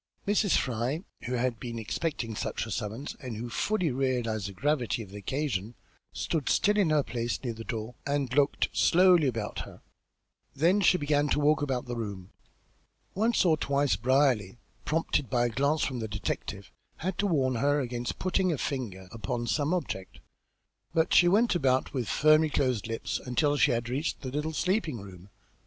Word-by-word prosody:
Mrs. 205 Hz, -2 st, +3 dB
Fry, 125 Hz, -, -1 dB, 0.2 s
who 125 Hz, -, -3 dB
had 125 Hz, -2 st, 0 dB
been 120 Hz, 0 st, -5 dB
expecting 115 Hz, +2 st, -3 dB
just 105 Hz, -, -4 dB
such -, -, -2 dB
a 110 Hz, -, -7 dB
summons 115 Hz, +6 st, -4 dB
and 125 Hz, -6 st, -6 dB
who 120 Hz, +2 st, -5 dB
fully 185 Hz, -, 0 dB
realised 120 Hz, -6 st, -1 dB
the -, -, -6 dB
gravity 125 Hz, +1 st, 0 dB
of 95 Hz, -, -14 dB
the 100 Hz, -, -8 dB
occasion, 120 Hz, -3 st, -2 dB, 0.4 s
stood 155 Hz, -5 st, -2 dB
still 210 Hz, +1 st, +3 dB
in 200 Hz, -6 st, +3 dB
her 150 Hz, -2 st, +3 dB
place 120 Hz, -1 st, -3 dB
near 120 Hz, -3 st, -2 dB
the 115 Hz, 0 st, -8 dB
door 110 Hz, 0 st, -5 dB
and 140 Hz, -3 st, -1 dB
looked 145 Hz, +1 st, +2 dB
slowly 180 Hz, -3 st, +5 dB
about 115 Hz, -4 st, -3 dB
her; -, -, -9 dB, 0.7 s
then 175 Hz, +8 st, +3 dB
she 180 Hz, 0 st, +5 dB
began 145 Hz, -1 st, +1 dB
to -, -, +2 dB
walk 150 Hz, +1 st, +3 dB
about 130 Hz, -4 st, -1 dB
the 120 Hz, -1 st, -4 dB
room. 100 Hz, -5 st, -6 dB, 0.8 s
Once 220 Hz, +1 st, +2 dB
or 165 Hz, -3 st, +5 dB
twice 140 Hz, -1 st, +1 dB
Brierly, 125 Hz, -5 st, +2 dB, 0.3 s
prompted 150 Hz, -5 st, 0 dB
by 120 Hz, -1 st, +2 dB
a -, -, +1 dB
glance 140 Hz, +5 st, +1 dB
from 130 Hz, -3 st, -2 dB
the 110 Hz, -, -3 dB
detective, 105 Hz, -1 st, -4 dB, 0.3 s
had 185 Hz, +2 st, -3 dB
to 205 Hz, -, +2 dB
warn 135 Hz, -8 st, +2 dB
her 145 Hz, +4 st, +2 dB
against 120 Hz, -2 st, -3 dB
putting 185 Hz, 0 st, +1 dB
a 155 Hz, -, -1 dB
finger 110 Hz, -10 st, -4 dB
upon 115 Hz, +2 st, -3 dB
some 145 Hz, +5 st, 0 dB
object, 95 Hz, -, -3 dB, 0.8 s
but 160 Hz, 0 st, +2 dB
she 175 Hz, -, +7 dB
went 215 Hz, +7 st, +4 dB
about 130 Hz, -6 st, +1 dB
with 125 Hz, -6 st, -2 dB
firmly 155 Hz, +1 st, +4 dB
closed 130 Hz, -7 st, 0 dB
lips 115 Hz, 0 st, -3 dB
until 145 Hz, +4 st, +1 dB
she 145 Hz, -, +4 dB
had 120 Hz, 0 st, 0 dB
reached 135 Hz, +6 st, -2 dB
the 130 Hz, -2 st, -5 dB
little 150 Hz, +3 st, -2 dB
sleeping 165 Hz, -, 0 dB
room. 95 Hz, -1 st, -12 dB
130 Hz, 180 wpm, -29 LUFS, 115-155 Hz, 0.8 s, she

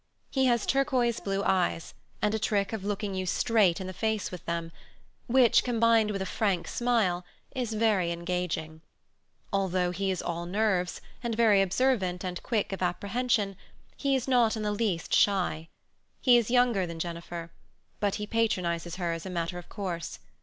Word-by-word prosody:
He 265 Hz, -1 st, +2 dB
has 235 Hz, -3 st, +2 dB
turquoise 260 Hz, -4 st, +1 dB
blue 195 Hz, 0 st, -2 dB
eyes, 180 Hz, -4 st, 0 dB, 0.3 s
and 210 Hz, 0 st, +2 dB
a 220 Hz, -, 0 dB
trick 200 Hz, -1 st, 0 dB
of 215 Hz, -3 st, -4 dB
looking 205 Hz, 0 st, -2 dB
you 185 Hz, -1 st, -3 dB
straight 205 Hz, -3 st, +3 dB
in 190 Hz, -, -5 dB
the 185 Hz, -, -6 dB
face 220 Hz, +2 st, -1 dB
with 180 Hz, -, -8 dB
them, 170 Hz, -1 st, -3 dB, 0.6 s
which, 250 Hz, -1 st, +5 dB
combined 230 Hz, -2 st, +3 dB
with 195 Hz, -2 st, -2 dB
a -, -, -5 dB
frank 185 Hz, -3 st, 0 dB
smile, 220 Hz, -8 st, +1 dB, 0.3 s
is 245 Hz, -4 st, -2 dB
very 210 Hz, -6 st, +2 dB
engaging. 170 Hz, -2 st, -3 dB, 0.7 s
Although 185 Hz, -2 st, +1 dB
he 195 Hz, +2 st, -2 dB
is 185 Hz, -2 st, -1 dB
all 170 Hz, 0 st, -3 dB
nerves, 190 Hz, -3 st, 0 dB, 0.2 s
and 235 Hz, -2 st, -2 dB
very 215 Hz, -4 st, +5 dB
observant 195 Hz, -3 st, +1 dB
and 180 Hz, -1 st, -4 dB
quick 215 Hz, -5 st, -1 dB
of 190 Hz, -, -5 dB
apprehension, 200 Hz, +3 st, 0 dB, 0.4 s
he 275 Hz, -1 st, +1 dB
is 260 Hz, -1 st, -1 dB
not 240 Hz, -4 st, +3 dB
in 215 Hz, -, -3 dB
the 210 Hz, -, 0 dB
least 205 Hz, -6 st, -1 dB
shy. 180 Hz, -5 st, +2 dB, 0.5 s
He 250 Hz, -2 st, +5 dB
is 235 Hz, -2 st, +3 dB
younger 240 Hz, -7 st, +3 dB
than 170 Hz, -1 st, -6 dB
Jennifer; 170 Hz, 0 st, -5 dB, 0.5 s
but 205 Hz, -2 st, 0 dB
he 210 Hz, -, -3 dB
patronizes 180 Hz, -7 st, -1 dB
her 175 Hz, -2 st, -2 dB
as 165 Hz, +2 st, -6 dB
a -, -, -5 dB
matter 175 Hz, 0 st, -3 dB
of 175 Hz, -, -13 dB
course. 180 Hz, -5 st, -4 dB
195 Hz, 175 wpm, -28 LUFS, 180-225 Hz, 0.7 s, which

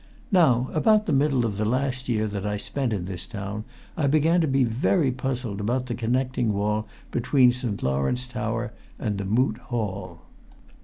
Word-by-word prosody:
Now, 130 Hz, -, +4 dB
about 215 Hz, +6 st, +4 dB
the -, -, 0 dB
middle 135 Hz, -3 st, +3 dB
of 105 Hz, -3 st, -2 dB
the 110 Hz, -, 0 dB
last 130 Hz, +2 st, -1 dB
year 110 Hz, -2 st, +1 dB
that 100 Hz, -2 st, -3 dB
I 105 Hz, 0 st, -1 dB
spent 130 Hz, +4 st, -2 dB
in 95 Hz, -5 st, -2 dB
this 90 Hz, -2 st, -5 dB
town, 105 Hz, -1 st, -5 dB, 0.3 s
I 150 Hz, -3 st, +1 dB
began 155 Hz, +4 st, +3 dB
to 160 Hz, -, +1 dB
be 135 Hz, -1 st, +3 dB
very 130 Hz, -, +2 dB
puzzled 125 Hz, -5 st, -3 dB
about 125 Hz, +4 st, 0 dB
the 125 Hz, -, -3 dB
connecting 120 Hz, 0 st, 0 dB
wall 105 Hz, +2 st, 0 dB, 0.2 s
between 125 Hz, +1 st, +4 dB
St. 120 Hz, -5 st, -3 dB
Lawrence 70 Hz, -, 0 dB
tower 115 Hz, 0 st, -3 dB, 0.2 s
and 105 Hz, -7 st, -2 dB
the 100 Hz, -, -3 dB
Moot 110 Hz, +3 st, +1 dB
Hall. 100 Hz, -8 st, -4 dB
120 Hz, 175 wpm, -25 LUFS, 105-130 Hz, 0.3 s, Now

